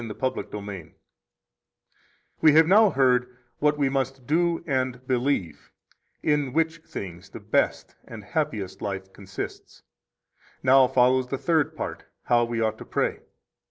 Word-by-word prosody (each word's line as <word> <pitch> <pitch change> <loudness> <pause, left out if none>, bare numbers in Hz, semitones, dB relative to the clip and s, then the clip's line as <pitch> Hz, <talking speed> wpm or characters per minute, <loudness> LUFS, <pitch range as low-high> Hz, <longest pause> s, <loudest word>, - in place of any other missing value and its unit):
The - - -6
Lord's 130 -1 -2
Prayer 105 -1 -6
1 95 -5 -9 1.5
We 155 -2 +6
have 160 +1 +7
now 205 +5 +6
heard 125 -3 +1 0.2
what 150 0 +2
we 140 -2 +2
must 135 -1 -2
do 170 +3 +1
and 130 -3 -2
believe, 125 - -1 0.5
in 145 -4 +1
which 165 +1 0
things 95 - -8
the - - -9
best - - -1
and - - -9
happiest 95 -2 -3
life 95 -2 -5
consists. 100 -1 -8 0.8
Now 130 0 +6
follows 130 +1 +3
the 135 - -3
third 155 +2 +1
part, - - -6 0.2
how 120 -1 +3
we 115 0 -3
ought 110 -1 -1
to - - -9
pray. - - -1
130 Hz, 145 wpm, -25 LUFS, 115-150 Hz, 1.5 s, have